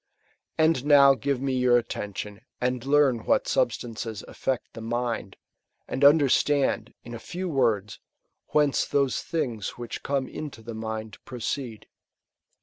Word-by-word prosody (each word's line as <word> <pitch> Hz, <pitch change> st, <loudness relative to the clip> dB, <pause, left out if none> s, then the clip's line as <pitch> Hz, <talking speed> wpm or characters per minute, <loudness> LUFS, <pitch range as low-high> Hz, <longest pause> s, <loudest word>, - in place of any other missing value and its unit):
And 160 Hz, -4 st, +3 dB
now 140 Hz, -2 st, +7 dB
give 135 Hz, +1 st, -1 dB
me 135 Hz, 0 st, -1 dB
your 125 Hz, -1 st, +4 dB
attention, 105 Hz, -2 st, -5 dB, 0.2 s
and 125 Hz, -1 st, -1 dB
learn 140 Hz, -4 st, +3 dB
what -, -, +2 dB
substances 115 Hz, -2 st, -1 dB
affect 130 Hz, -2 st, -3 dB
the 115 Hz, -, -8 dB
mind; 115 Hz, -3 st, -3 dB, 0.5 s
and 135 Hz, -, -3 dB
understand, 145 Hz, -1 st, +3 dB
in 120 Hz, -, -9 dB
a 115 Hz, -, -6 dB
few 180 Hz, +10 st, -5 dB
words, 115 Hz, -, 0 dB, 0.5 s
whence 150 Hz, -2 st, +2 dB
those 140 Hz, -2 st, +1 dB
things 120 Hz, -, -3 dB
which 120 Hz, -1 st, -6 dB
come 135 Hz, -2 st, -1 dB
into 145 Hz, -7 st, -8 dB
the 115 Hz, +1 st, -7 dB
mind 110 Hz, -1 st, -5 dB
proceed. 120 Hz, -2 st, -5 dB
125 Hz, 135 wpm, -26 LUFS, 115-140 Hz, 0.5 s, now